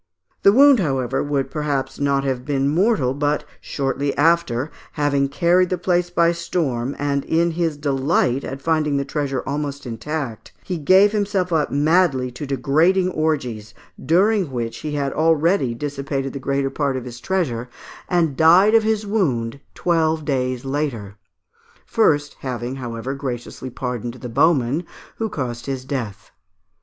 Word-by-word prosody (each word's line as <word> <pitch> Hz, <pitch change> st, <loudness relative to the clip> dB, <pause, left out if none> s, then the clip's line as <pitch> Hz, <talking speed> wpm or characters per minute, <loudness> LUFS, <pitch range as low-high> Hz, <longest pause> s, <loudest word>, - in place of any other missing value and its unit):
The 200 Hz, -, +6 dB
wound, 275 Hz, +2 st, +6 dB
however, 135 Hz, -8 st, 0 dB
would 145 Hz, -2 st, -1 dB
perhaps 145 Hz, -4 st, -2 dB
not 140 Hz, -1 st, +1 dB
have 130 Hz, -2 st, -2 dB
been 135 Hz, -1 st, 0 dB
mortal, 165 Hz, -, +2 dB
but, 145 Hz, +1 st, 0 dB, 0.2 s
shortly 140 Hz, 0 st, -2 dB
after, 155 Hz, -4 st, +2 dB, 0.2 s
having 140 Hz, -2 st, +1 dB
carried 175 Hz, +4 st, +3 dB
the 185 Hz, -, 0 dB
place 175 Hz, 0 st, 0 dB
by 170 Hz, -1 st, +3 dB
storm, 150 Hz, -7 st, -2 dB
and 140 Hz, -1 st, -1 dB
in 170 Hz, +1 st, +1 dB
his 165 Hz, -2 st, -1 dB
delight 135 Hz, -2 st, +1 dB
at 135 Hz, +1 st, -6 dB
finding 155 Hz, -3 st, +1 dB
the 140 Hz, -, -1 dB
treasure 140 Hz, -3 st, -2 dB
almost 140 Hz, 0 st, -4 dB
intact, 125 Hz, +1 st, -5 dB
he 180 Hz, -3 st, -4 dB
gave 190 Hz, +7 st, +5 dB
himself 200 Hz, -4 st, -1 dB
up 155 Hz, -2 st, +1 dB
madly 145 Hz, -3 st, +2 dB
to 135 Hz, +4 st, -7 dB
degrading 160 Hz, +8 st, +2 dB
orgies, 125 Hz, -, -2 dB, 0.3 s
during 190 Hz, +1 st, +3 dB
which 120 Hz, -3 st, -4 dB
he 150 Hz, -1 st, -5 dB
had 140 Hz, -2 st, -1 dB
already 160 Hz, -4 st, +2 dB
dissipated 140 Hz, 0 st, -3 dB
the 140 Hz, -, -5 dB
greater 135 Hz, 0 st, -1 dB
part 140 Hz, -3 st, -1 dB
of 130 Hz, -, -6 dB
his 120 Hz, -1 st, -8 dB
treasure, 125 Hz, -9 st, -2 dB, 0.4 s
and 170 Hz, -6 st, +1 dB
died 175 Hz, +8 st, +6 dB
of 225 Hz, -, +6 dB
his 215 Hz, -1 st, 0 dB
wound 140 Hz, -, -1 dB, 0.2 s
twelve 160 Hz, -3 st, +1 dB
days 130 Hz, -2 st, -1 dB
later; 130 Hz, -8 st, -3 dB, 0.7 s
first 145 Hz, -10 st, +1 dB
having, 125 Hz, 0 st, -4 dB
however, 120 Hz, 0 st, -5 dB
graciously 130 Hz, -1 st, -5 dB
pardoned 120 Hz, -1 st, -4 dB
the 125 Hz, -1 st, -8 dB
bowman 140 Hz, +2 st, +2 dB, 0.3 s
who 225 Hz, -1 st, -2 dB
caused 125 Hz, -, -5 dB
his 130 Hz, -2 st, -4 dB
death. 115 Hz, -7 st, -5 dB
145 Hz, 150 wpm, -21 LUFS, 130-170 Hz, 0.7 s, The